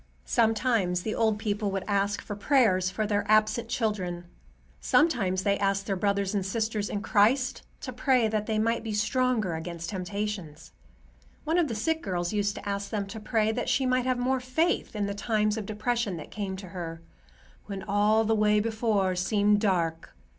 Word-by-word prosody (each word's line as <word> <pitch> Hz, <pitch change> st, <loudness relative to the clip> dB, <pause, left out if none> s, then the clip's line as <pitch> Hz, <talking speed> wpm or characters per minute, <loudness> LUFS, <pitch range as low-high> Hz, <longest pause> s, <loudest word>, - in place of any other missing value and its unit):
Sometimes 220 Hz, -6 st, +1 dB
the 215 Hz, -, -2 dB
old 220 Hz, -2 st, +1 dB
people 210 Hz, -1 st, -1 dB
would 195 Hz, -1 st, -2 dB
ask 200 Hz, 0 st, 0 dB
for 205 Hz, -, -5 dB
prayers 205 Hz, -6 st, +3 dB
for 215 Hz, +3 st, -2 dB
their 205 Hz, -1 st, 0 dB
absent 215 Hz, +2 st, +3 dB
children. 185 Hz, -7 st, -2 dB, 0.5 s
Sometimes 195 Hz, -, +2 dB
they 200 Hz, 0 st, +1 dB
asked 195 Hz, 0 st, 0 dB
their 195 Hz, -, -1 dB
brothers 200 Hz, +1 st, 0 dB
and 200 Hz, -2 st, 0 dB
sisters 215 Hz, +1 st, -2 dB
in 205 Hz, 0 st, -3 dB
Christ 245 Hz, +5 st, +2 dB, 0.2 s
to 255 Hz, -, -6 dB
pray 250 Hz, -1 st, +2 dB
that 215 Hz, -1 st, -2 dB
they 220 Hz, -, 0 dB
might 230 Hz, +2 st, +1 dB
be 220 Hz, -2 st, -4 dB
stronger 220 Hz, -2 st, +1 dB
against 170 Hz, +2 st, -5 dB
temptations. 190 Hz, -4 st, -5 dB, 0.7 s
One 320 Hz, +3 st, +1 dB
of 335 Hz, -, +2 dB
the 230 Hz, -, -4 dB
sick 320 Hz, +9 st, 0 dB
girls 175 Hz, -1 st, -2 dB
used 205 Hz, -1 st, 0 dB
to -, -, -8 dB
ask 200 Hz, 0 st, -3 dB
them 205 Hz, -3 st, -2 dB
to 220 Hz, +3 st, -8 dB
pray 220 Hz, 0 st, +1 dB
that 240 Hz, +2 st, -2 dB
she 270 Hz, -, +2 dB
might 255 Hz, 0 st, +1 dB
have 255 Hz, -1 st, +1 dB
more 255 Hz, +1 st, +1 dB
faith 255 Hz, +3 st, 0 dB
in 205 Hz, -1 st, 0 dB
the 200 Hz, -, -2 dB
times 210 Hz, 0 st, 0 dB
of 215 Hz, -3 st, -5 dB
depression 215 Hz, -2 st, -1 dB
that 155 Hz, -, -9 dB
came 200 Hz, -3 st, -4 dB
to 190 Hz, -1 st, -9 dB
her, 165 Hz, -2 st, -6 dB, 0.6 s
"when 195 Hz, -2 st, -5 dB
all 210 Hz, +2 st, +3 dB
the 225 Hz, -, +2 dB
way 210 Hz, -1 st, +3 dB
before 215 Hz, -4 st, 0 dB
seemed 205 Hz, +2 st, +2 dB
dark." 170 Hz, -6 st, -1 dB
210 Hz, 185 wpm, -28 LUFS, 195-225 Hz, 0.7 s, prayers